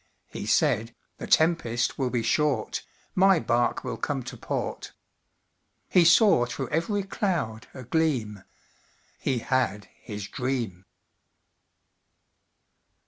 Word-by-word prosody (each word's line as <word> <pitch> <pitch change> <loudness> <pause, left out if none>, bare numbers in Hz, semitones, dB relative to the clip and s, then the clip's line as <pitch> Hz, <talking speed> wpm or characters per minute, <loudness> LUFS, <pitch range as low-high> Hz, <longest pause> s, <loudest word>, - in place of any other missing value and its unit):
He 105 - -6
said, 115 -4 +2 0.2
"The - - -6
tempest 150 -9 +2
will 130 -2 +1
be 120 -2 -1
short, 135 -1 0 0.3
My 190 -1 +5
bark 120 -4 0
will - - -4
come 135 -3 -2
to - - -8
port." - - -4 1.0
He 175 -2 +5
saw 165 - +5
through 130 +1 -4
every 200 +5 0
cloud 170 - -2
a 130 - -8
gleam 120 - -1 0.8
He 130 - 0
had 115 -4 -1
his 105 -2 -6
dream. 120 -8 -3
130 Hz, 110 wpm, -26 LUFS, 115-160 Hz, 1.0 s, My